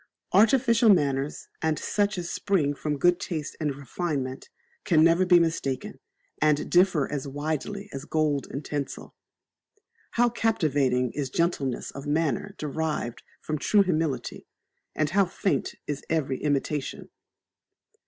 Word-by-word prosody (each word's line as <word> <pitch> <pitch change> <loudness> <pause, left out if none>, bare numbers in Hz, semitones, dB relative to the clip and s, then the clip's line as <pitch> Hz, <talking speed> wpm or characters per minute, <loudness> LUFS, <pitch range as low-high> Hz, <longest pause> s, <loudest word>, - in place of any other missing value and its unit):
Artificial 230 +1 +5
manners, 140 -6 +2
and 160 -1 +1
such 205 -1 0
as 175 -1 -3
spring 165 -9 0
from 150 +1 -3
good 175 +4 +3
taste 155 -4 -4
and 150 -3 -1
refinement, 140 -1 -4 0.3
can 160 -3 +4
never 170 +3 +4
be 175 -1 +7
mistaken, 160 -6 -2 0.4
and 150 -1 +2
differ 175 -5 +4
as 140 -1 -3
widely 155 +8 -3
as 135 +1 -6
gold 155 -3 0
and 140 +3 -6
tinsel. 145 -2 -5 1.0
How 240 +1 +4
captivating 145 - +1
is 140 -3 -3
gentleness 140 -5 -1
of 140 +1 -8
manner 160 +6 0
derived 150 -5 -3 0.2
from 155 -1 -3
true 205 +5 +4
humility, 160 -8 -2 0.5
and 155 -1 0
how 195 +1 +4
faint 190 +1 -1
is 145 -1 -4
every 140 -5 0
imitation! 145 -1 -2
155 Hz, 130 wpm, -26 LUFS, 140-175 Hz, 1.0 s, be